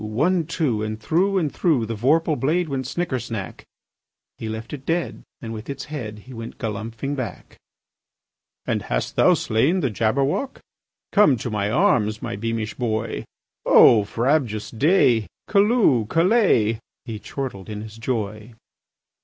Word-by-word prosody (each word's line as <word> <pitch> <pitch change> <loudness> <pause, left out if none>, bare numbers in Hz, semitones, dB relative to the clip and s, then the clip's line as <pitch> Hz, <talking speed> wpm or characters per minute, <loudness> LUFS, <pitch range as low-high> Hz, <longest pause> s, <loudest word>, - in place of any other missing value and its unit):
One, 155 +10 +1
two! 150 -10 0
And 110 0 -3
through 185 - +1
and 155 -6 0
through 150 -10 +1
The 115 - -4
vorpal 150 +8 +2
blade 160 +6 0
went 130 -2 -3
snicker 165 -4 -2
snack! 115 -5 -6 0.7
He 110 - -4
left 110 +4 -6
it 140 -3 -6
dead, 165 +4 -2 0.2
and 115 -5 -6
with 110 +3 -8
its 140 -1 -5
head 105 -7 -6
He 130 - -11
went 115 0 -8
galumphing 115 +4 -4
back. 130 -4 -7 1.1
"And - - -1
hast - - -3
thou - - +5
slain 140 +12 +1
the 135 - 0
Jabberwock? 135 - 0 0.5
Come 200 - +5
to 115 +1 -5
my 105 -1 -1
arms, 115 - +2
my 120 -3 -4
beamish 110 0 -3
boy! 110 -3 -2 0.4
O 110 -3 +7
frabjous 115 0 0
day! 125 - +3 0.2
Callooh! 200 - +3
Callay!" 165 - +3 0.3
He 110 -4 -6
chortled 110 -6 -6
in 105 -1 -5
his 110 0 -10
joy. 110 -1 -4
120 Hz, 145 wpm, -23 LUFS, 110-155 Hz, 1.1 s, O